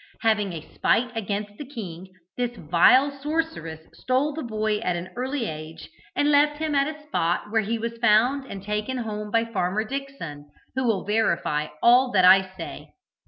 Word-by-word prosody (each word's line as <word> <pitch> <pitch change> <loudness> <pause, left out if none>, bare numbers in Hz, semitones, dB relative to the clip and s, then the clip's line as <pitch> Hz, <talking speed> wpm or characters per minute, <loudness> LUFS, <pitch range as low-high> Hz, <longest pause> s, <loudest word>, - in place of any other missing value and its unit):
Having 210 -4 +1
a 160 -2 -8
spite 245 0 +1
against 205 -1 -3
the - - -4
king, 190 - -8 0.3
this 245 -1 -2
vile 195 - +5
sorceress 280 - -3
stole 265 +4 0
the 320 - -5
boy 215 -3 -1
at 180 -5 -1
an 175 +2 -6
early 260 0 -2
age, 155 -1 -8 0.2
and 290 +1 +2
left 295 +1 +4
him 310 -1 -2
at 275 0 +3
a 305 -1 -7
spot 205 - -1
where 225 0 +3
he 220 +3 -2
was 230 +1 -5
found 240 +5 +3
and 195 -5 -8
taken 210 +5 -2
home 210 -3 -4
by 230 +2 +2
Farmer 205 -2 -1
Dickson, 225 - -7 0.2
who 260 0 -1
will 210 -5 0
verify 170 -8 +1 0.2
all 250 +2 +6
that 185 -2 +5
I 190 +1 +8 0.2
say. - - -8
225 Hz, 175 wpm, -25 LUFS, 190-265 Hz, 0.3 s, I